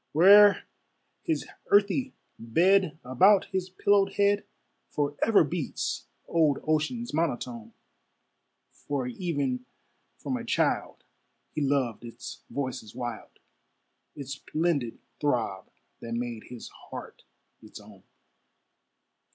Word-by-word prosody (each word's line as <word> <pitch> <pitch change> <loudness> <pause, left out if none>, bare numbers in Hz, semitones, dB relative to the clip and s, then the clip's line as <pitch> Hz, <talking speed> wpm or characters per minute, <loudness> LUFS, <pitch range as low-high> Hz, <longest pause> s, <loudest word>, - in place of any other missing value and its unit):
Where'er 200 +5 +7 0.6
his - - -1 0.2
earthy 210 +6 +2 0.2
bed, 175 +9 +3
About 185 +11 +5
his 190 -1 -2
pillowed 200 +1 +2
head 205 0 +2 0.4
Forever 150 +9 +2
beats 155 -1 -3 0.2
old 155 -4 +3
Ocean's 160 +11 -1
monotone: 125 -8 -2 1.0
For 140 -3 -4
even 135 -3 -2 0.5
from - - -3
a - - -6
child - - 0 0.5
he 155 - -3
loved 135 -6 0
its 115 -1 -9
voices 130 -6 -5
wild, 120 -3 -6 0.8
Its 140 -2 -7
splendid 145 -3 -1 0.2
throb 115 -9 -1 0.3
that 115 0 -5
made 120 -2 -4
his 125 -1 -9
heart - - -10 0.4
its - - -12
own. - - -16
145 Hz, 100 wpm, -28 LUFS, 125-190 Hz, 1.0 s, Where'er